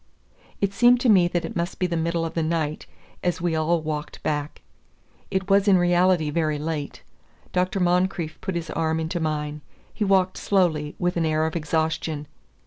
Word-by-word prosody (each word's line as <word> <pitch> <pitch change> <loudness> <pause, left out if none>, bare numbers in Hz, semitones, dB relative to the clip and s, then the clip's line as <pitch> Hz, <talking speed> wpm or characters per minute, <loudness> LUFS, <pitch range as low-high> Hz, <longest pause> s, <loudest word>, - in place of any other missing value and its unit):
It 200 -1 +1
seemed 245 +3 +5
to 250 - +3
me 185 -5 +6
that 175 -1 -1
it - - -7
must 170 +1 -2
be 185 - 0
the 175 -1 -1
middle 165 0 0
of 165 - -5
the 165 - 0
night, 155 -1 -2 0.4
as 180 0 0
we 175 -2 0
all 160 +1 +1
walked 155 0 -5
back. 150 -1 -3 0.7
It 190 0 -1
was 200 +1 +3
in 195 -2 +6
reality 175 -2 +3
very 155 -1 0
late. 150 -1 -4 0.5
Dr. 185 +2 0
Moncrieff 180 -2 0
put 190 - -3
his 170 -1 -4
arm 160 0 0
into 160 +2 -2
mine. 150 -1 -2 0.3
He 215 - -2
walked 190 -2 +2
slowly, 160 -7 +1
with 180 0 -1
an 165 - +1
air 155 0 +1
of 160 - -3
exhaustion. 160 -1 -1
170 Hz, 185 wpm, -24 LUFS, 155-180 Hz, 0.7 s, me